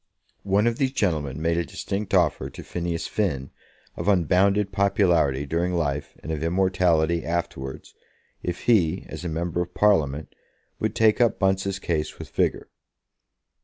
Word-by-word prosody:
One 100 +2 +2
of 120 0 0
these 135 -2 +1
gentlemen 75 - -1
made 85 +1 +1
a - - 0
distinct 100 +2 -3
offer 75 -6 +2
to - - -10
Phineas 85 -1 -3
Finn 70 -11 -2 0.4
of 85 - -5
unbounded 100 +2 +3
popularity 90 - +2
during 85 +5 -1
life 75 -4 -2
and 80 - -5
of 75 -2 -3
immortality 85 -2 +2
afterwards, 70 -6 -4 0.5
if 90 0 -4
he, 95 -7 +2
as 80 +2 -7
a 85 - -3
member 85 +2 -2
of 90 0 -6
Parliament, 80 -8 +2 0.5
would - - -1
take 110 +2 +4
up 120 - +3
Bunce's 95 0 +1
case 80 -5 -2
with - - -9
vigour. - - 0
85 Hz, 150 wpm, -25 LUFS, 80-100 Hz, 0.5 s, take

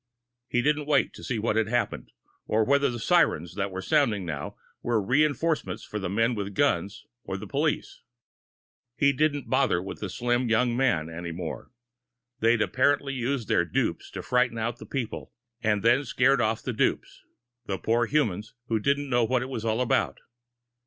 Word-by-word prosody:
He 120 -1 0
didn't 150 0 +1
wait 145 -3 +2
to - - -12
see 125 - -2
what 110 0 0
had 110 -1 +2
happened, 120 +2 -2 0.4
or 110 +1 +2
whether 140 +2 +3
the 120 - -4
sirens 110 - +2
that 100 0 -2
were 95 0 -6
sounding 120 - +2
now 75 -4 -5 0.3
were 120 -2 +1
reinforcements 150 +8 0
for 105 - -5
the 95 -3 -3
men 115 +5 +2
with 100 -3 -4
guns 100 -8 0 0.2
or - - -4
the - - -7
police. - - -2 0.9
He 140 +1 +3
didn't 145 0 0
bother 130 -10 +2
with 95 - -7
the 105 - -4
slim 120 +3 0
young 120 +1 +2
man 120 -12 +1
any 85 +1 -6
more. 85 -1 -6 0.7
They'd 115 0 +3
apparently 140 +3 +1
used 125 -2 -2
their - - +3
dupes 85 - -2
to - - -5
frighten 125 -2 +1
out 115 +1 -2
the - - -10
people, 125 -6 -4 0.3
and 105 -3 +1
then 120 +2 +5
had 140 - -7
scared 130 +2 +3
off 110 0 0
the 125 - -3
dupes 110 - -1 0.5
the 95 - -1
poor 115 +4 +1
humans 110 -7 -1
who 115 -1 +1
didn't 140 +5 0
know 120 -2 +2
what 125 +2 +1
it 130 - -6
was 115 -5 -4
all 115 +1 0
about. 125 - +1
120 Hz, 185 wpm, -27 LUFS, 105-135 Hz, 0.9 s, then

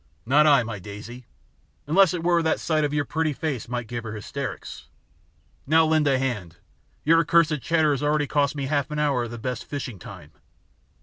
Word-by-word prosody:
"Not 145 +5 +4
I, 140 -5 +5
my 110 -3 -6
daisy, 105 +5 -10 0.6
unless 180 +4 +4
it 165 - -4
were 170 -1 +3
that 160 -1 +1
a - - -13
sight 155 -2 0
of 145 - 0
your 145 -1 0
pretty 160 0 -1
face 140 -6 -4
might 120 -1 -3
give 120 +1 -5
her 115 -2 -6
hysterics. 120 +1 -6 0.8
Now 160 +2 +5
lend 155 -1 +2
a 135 -2 +3
hand, 105 -11 -3 0.5
your 165 +2 +5
accursed 160 -3 +3
chatter 160 0 +2
has 140 - -1
already 150 0 +1
cost 145 0 0
me 140 -2 -3
half 140 0 -1
an 150 - -4
hour 140 -5 +1
of - - -7
the 120 - -7
best 125 +2 -4
fishing 130 -8 -6
time." - - -11
145 Hz, 200 wpm, -24 LUFS, 120-155 Hz, 0.8 s, I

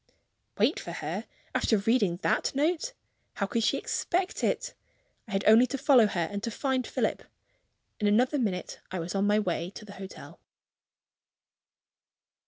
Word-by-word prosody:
Wait - - +2
for - - -7
her, - - -4 0.3
after 220 - +2
reading 200 -4 +2
that - - +1
note! 330 - 0 0.4
How 200 - 0
could 230 +3 -1
she - - +2
expect 365 +3 -1
it? - - 0 0.5
I - - -11
had 195 - +1
only 225 +4 +7
to 275 - -3
follow 265 -5 +5
her, 180 -4 -2
and 200 0 -3
to 230 - -2
find 260 +2 -1
Philip. - - -1 0.8
In 210 - +1
another 250 +7 +3
minute, 195 -7 -2
I 185 - -4
was 170 0 -4
on 200 +1 +1
my 210 +1 +4
way 175 -4 -1
to 205 +2 -11
the 200 - -10
hotel. 190 - -10
220 Hz, 160 wpm, -28 LUFS, 200-265 Hz, 0.8 s, only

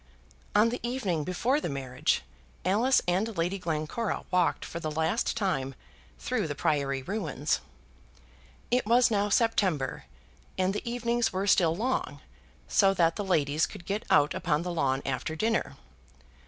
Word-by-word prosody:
On 215 +2 +5
the 245 - -3
evening 225 - -1
before 240 - 0
the - - -2
marriage 130 -2 -1 0.4
Alice 225 +8 +3
and 195 +4 0
Lady 175 +4 0
Glencora 165 +7 -2
walked 180 -2 +1
for 170 - -6
the 155 - -3
last 160 +10 0
time 135 - -1 0.4
through - - -1
the 145 - -4
Priory 140 -2 0
ruins. 155 - -1 1.1
It 245 -3 +2
was 240 +1 +5
now 205 -1 +1
September, 195 - +1 0.5
and 185 +1 +1
the 210 +3 -4
evenings 235 -1 0
were 190 +1 -1
still 170 -4 +4
long, 250 +7 -2 0.5
so 195 -1 +4
that 165 -2 +3
the 205 - -3
ladies 155 -5 +1
could 190 -5 -11
get 200 +2 -2
out 145 - +4
upon 155 -1 0
the 180 0 -3
lawn 135 -4 0
after 135 +4 -2
dinner. 225 +7 -1
180 Hz, 150 wpm, -28 LUFS, 155-220 Hz, 1.1 s, On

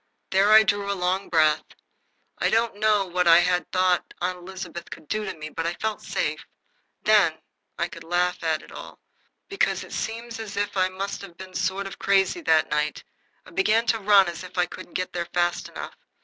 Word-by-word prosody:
There 195 +2 +4
I 220 0 +9
drew 200 0 0
a 200 - -2
long 185 +2 -1
breath. 155 -2 +4 0.8
I - - +2
don't 225 -2 +1
know 210 -2 +3
what 180 -1 0
I 170 +1 +8 0.3
thought 185 -1 +1
Aunt 180 +1 -2
Elizabeth 180 -1 -8
could 155 - -10
do 215 +5 -2
to 190 - -5
me, 155 0 -7
but 165 +2 -3
I 170 - -2
felt 220 +2 -3
safe. - - -2 0.6
Then - - +4 0.4
I - - 0
could 165 -5 -11
laugh 175 +2 0
at 160 -1 0
it - - -15
all, - - -10 0.5
because 395 - 0
it - - -11
seems 230 +1 -4
as 215 -2 -7
if 205 0 -1
I 185 -1 +2
must 195 +2 -5
have 175 -4 -11
been 185 0 -10
sort 190 +2 -1
of 195 - -8
crazy 195 - +2
that 160 - +3
night 150 0 -1 0.4
I - - -14
began 215 +6 +2
to 225 - -3
run 200 -2 +5
as 175 +1 -5
if 185 0 -11
I 180 - +3
couldn't 175 - -11
get 185 0 -2
there 170 -1 -3
fast 175 0 0
enough. - - -7
185 Hz, 205 wpm, -25 LUFS, 175-205 Hz, 0.8 s, I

